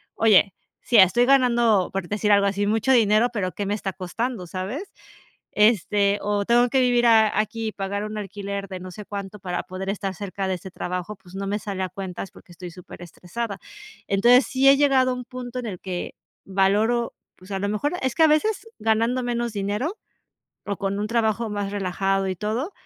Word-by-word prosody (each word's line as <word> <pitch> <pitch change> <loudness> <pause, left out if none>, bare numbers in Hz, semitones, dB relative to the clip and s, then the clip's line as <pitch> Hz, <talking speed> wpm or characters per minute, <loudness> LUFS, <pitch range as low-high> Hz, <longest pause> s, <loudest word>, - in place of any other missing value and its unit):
"Oye, 210 -3 +4 0.3
sí, 240 - -1
estoy 205 +6 +6
ganando, 240 -7 +3
por 195 -3 -3
decir 210 0 0
algo 200 0 +5
así, 200 +1 0
mucho 220 +4 +1
dinero, 220 0 +4
pero 185 -4 -2
qué 205 - -4
me 205 - -1
está 200 -2 -4
costando", 200 +1 -4
¿sabes?, 205 - -5 0.6
este, 205 -1 +3
o 205 0 0
tengo 240 +1 +4
que 265 - +3
vivir 245 -1 +3
a 220 -2 +5
aquí 225 +1 -3
y - - -5
pagar 200 +1 -3
un 215 0 -6
alquiler 200 0 -5
de 185 -2 -7
no 185 - -8
sé 210 +4 -9
cuánto 200 0 -6
para 180 -1 -3
poder 190 +1 -5
estar 195 -1 -3
cerca 195 0 -4
de 190 - 0
este 185 +1 -8
trabajo, 180 +3 -4
pues 185 -1 -18
no 195 0 -4
me 205 +2 -1
sale 195 -2 -4
a 185 - -3
cuentas 190 -1 -6
porque 175 - -16
estoy 175 0 -9
superestresada, 180 +4 -7 0.5
entonces, 240 +6 +5
sí 265 0 +1
he 275 - +7
llegado 270 -3 +4
a - - -1
un 250 -1 -6
punto 250 -1 -7
en 240 - -6
el 190 -5 -5
que 180 -2 -5 0.3
valoro, 205 +5 +1 0.2
pues 185 +2 -17
a 195 - -1
lo 200 - -1
mejor 215 +8 -1
es 260 -2 -1
que 325 - +2
a - - +8
veces 395 +9 +1
ganando 230 +3 +1
menos 240 -1 -2
dinero 210 - -2 0.7
o 200 - -2
con 200 0 -2
un 210 - -1
trabajo 230 -1 0
más 205 -1 -3
relajado 195 0 -1
y 185 - -3
todo, 230 - -3
205 Hz, 200 wpm, -24 LUFS, 195-235 Hz, 0.7 s, a